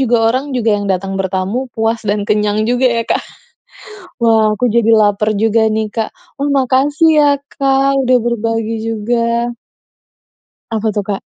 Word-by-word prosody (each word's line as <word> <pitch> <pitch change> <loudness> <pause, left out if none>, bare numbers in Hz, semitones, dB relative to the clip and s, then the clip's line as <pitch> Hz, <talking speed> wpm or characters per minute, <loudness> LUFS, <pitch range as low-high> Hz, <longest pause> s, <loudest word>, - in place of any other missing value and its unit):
juga, 245 -2 +2 0.2
orang 265 +3 -2
juga 230 -2 +1
yang 205 - -4
datang 195 0 -1
bertamu 195 +7 -2
puas 225 +1 -1
dan 205 0 0
kenyang 210 0 0
juga 245 +3 +1
ya 230 -1 0
Kak. - - 0 1.0
Wah, 220 -2 +3
aku 245 +2 0
jadi 230 0 +2
laper 210 0 +2
juga 220 +1 +2
nih 220 0 -1
Kak. 225 0 -2 0.3
Wah, 280 - 0
makasih 275 +4 +2
ya 290 -1 +5 0.2
Kak 275 0 +1
udah 255 -1 +3
berbagi 225 -1 -2
juga. 235 +2 -1 1.2
Apa 220 -1 -1
tuh, 205 0 -2
Kak? 200 -2 -3
225 Hz, 155 wpm, -15 LUFS, 210-250 Hz, 1.2 s, ya